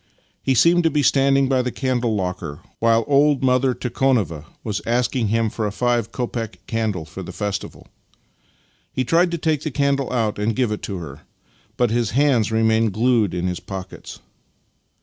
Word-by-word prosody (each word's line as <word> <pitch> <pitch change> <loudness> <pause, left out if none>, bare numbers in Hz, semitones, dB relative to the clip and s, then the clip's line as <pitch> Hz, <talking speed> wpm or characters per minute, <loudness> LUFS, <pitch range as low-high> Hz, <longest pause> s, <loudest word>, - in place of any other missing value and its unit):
He 135 - +1
seemed 170 +7 +5
to - - +5
be 150 -1 0
standing 135 0 +3
by 130 -1 +2
the 125 0 -2
candle 125 -4 -1
locker, 90 -6 -4 0.2
while 115 0 +3
old 145 -1 +3
mother 130 0 +2
Tikhonova 120 - 0 0.2
was 105 -2 -3
asking 120 0 0
him 115 +1 +1
for 110 -2 -2
a - - -3
five 120 0 0
copeck 120 -3 -4
^ - - -18
candle 110 -7 -2
for 80 +4 -9
the 90 - -7
festival. 100 -1 -5 1.0
He 130 - -1
tried 170 +8 +3
to 170 - -2
take 155 -2 0
the 155 - -3
candle 140 -1 0
out 110 -5 -1
and 105 +1 0
give 125 -4 +1
it 105 - -3
to 100 - -3
her, 75 -4 -8 0.6
but 120 -3 +2
his 120 -2 +1
hands 130 -7 +3
remained 110 -1 +2
glued 110 -3 +2
in 90 0 -2
his 90 -1 -2
pockets. 95 -1 -8
115 Hz, 180 wpm, -21 LUFS, 105-135 Hz, 1.0 s, seemed